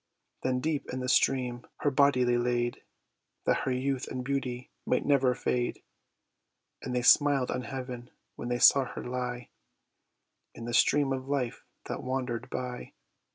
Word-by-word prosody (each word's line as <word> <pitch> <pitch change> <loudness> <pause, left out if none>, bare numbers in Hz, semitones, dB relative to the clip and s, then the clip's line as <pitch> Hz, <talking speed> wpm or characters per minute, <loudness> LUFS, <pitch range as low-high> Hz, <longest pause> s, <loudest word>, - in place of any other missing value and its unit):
Then 130 -1 0
deep 155 -1 -2
in 130 - -3
the 125 - -3
stream 125 -2 +1
her 145 - +2
body 140 -2 +4
they 120 0 +2
laid, 120 0 0 0.6
That - - +3
her 130 - 0
youth 130 +1 -1
and 125 -1 -5
beauty 130 -2 -3
might - - 0
never 135 -3 +3
fade; 120 0 -1 1.0
And 125 - -4
they 125 - 0
smiled 140 0 +5
on 125 - -2
heaven, 125 -1 -6 0.3
when 120 - -5
they 120 - 0
saw 135 +2 +6
her - - -7
lie 125 -1 -4 1.1
In 115 - -8
the 120 - -4
stream 140 +2 +4
of 130 0 -5
life 125 -5 -2 0.2
that - - -4
wander'd 125 -2 -3
by. 125 -1 -5
125 Hz, 155 wpm, -29 LUFS, 125-135 Hz, 1.1 s, saw